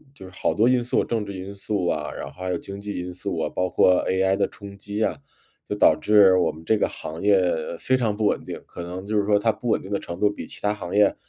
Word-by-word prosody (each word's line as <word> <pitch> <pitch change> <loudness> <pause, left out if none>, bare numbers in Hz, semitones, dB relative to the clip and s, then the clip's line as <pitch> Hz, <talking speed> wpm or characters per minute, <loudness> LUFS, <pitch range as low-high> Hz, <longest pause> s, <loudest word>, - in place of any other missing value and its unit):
就 95 - -11
是 95 - -13
好 - - -1
多 115 +3 +3
因 125 -1 +3
素， 120 - +1
政 115 -2 -1
治 100 - -6
因 95 +2 -7
素 100 -2 -2
啊， 75 -3 -1
然 - - -6
后 - - -9
还 95 - -2
有 90 - 0
经 100 +3 -8
济 105 -3 -5
因 90 0 -5
素 95 -1 -4
啊， 75 - -1
包 90 0 0
括 90 +1 +4
AI 95 +1 +2
的 100 - +1
冲 100 -1 -11
击 105 +2 -3
啊， 85 - 0 0.5
就 - - -3
导 - - +6
致 100 -3 +6
我 - - +2
们 80 +1 -13
这 110 - +3
个 - - +2
行 80 +2 -7
业 95 -3 +3 0.3
非 130 - +2
常 110 -5 0
不 110 - 0
稳 - - +1
定， - - -6
可 85 - -8
能 90 +2 -6
就 105 +1 -2
是 100 - +2
说 105 0 +4
它 110 +2 +2
不 120 - -8
稳 - - +3
定 95 - -10
的 100 - 0
程 85 +1 -7
度， 105 - +4
比 - - -8
其 - - -8
他 105 0 +1
行 90 -4 -7
业 105 -1 +4
100 Hz, 315 characters per minute, -24 LUFS, 90-105 Hz, 0.5 s, 导